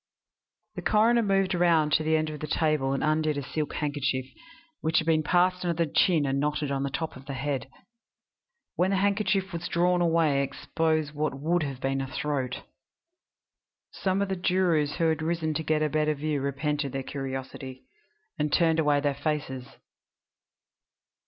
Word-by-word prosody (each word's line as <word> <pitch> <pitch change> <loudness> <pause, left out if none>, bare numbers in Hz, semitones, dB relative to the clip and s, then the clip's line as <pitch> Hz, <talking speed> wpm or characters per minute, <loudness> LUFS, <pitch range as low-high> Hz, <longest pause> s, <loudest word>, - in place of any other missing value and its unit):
The - - -6
coroner 230 +3 +4
moved 195 -2 +1
round 170 -4 +3
to 155 - +3
the 160 0 +2
end 155 0 -1
of 150 - -7
the 155 - -4
table 150 -4 +1
and 135 - -1
undid 155 -1 +1
a 140 - -3
silk 150 +3 -3
handkerchief, 140 -3 -1 0.5
which 160 +2 +1
had 160 - +2
been 160 -1 +3
passed 180 +3 +2
under 170 -1 0
the 150 - -10
chin 165 -6 +3
and 135 0 0
knotted 150 0 -1
on 135 -1 -1
the 140 - -1
top 160 +3 -4
of 135 +2 -13
the 140 - -4
head. 135 -1 -3 1.1
When 185 - +2
the 195 - +1
handkerchief 195 -1 +1
was 170 +1 -4
drawn 180 +1 +2
away 165 -4 +3
it - - +1
exposed 155 +2 -1
what 155 +3 0
had 135 -4 -4
been 135 0 0
the 135 - -3
throat. 130 -2 -3 1.3
Some 195 +1 0
of 200 - -4
the 190 - 0
jurors 175 -5 +1
who 165 -2 +1
had 160 -1 0
risen 160 -1 -1
to 160 - -2
get 155 0 +1
a - - +2
better 155 0 +1
view 150 -1 -2
repented 140 0 -2
their 135 0 -3
curiosity, 130 -1 -6 0.6
and 150 0 0
turned 165 -1 +3
away 145 -2 +3
their 145 -1 +1
faces. 140 -3 -3
155 Hz, 180 wpm, -27 LUFS, 140-170 Hz, 1.3 s, coroner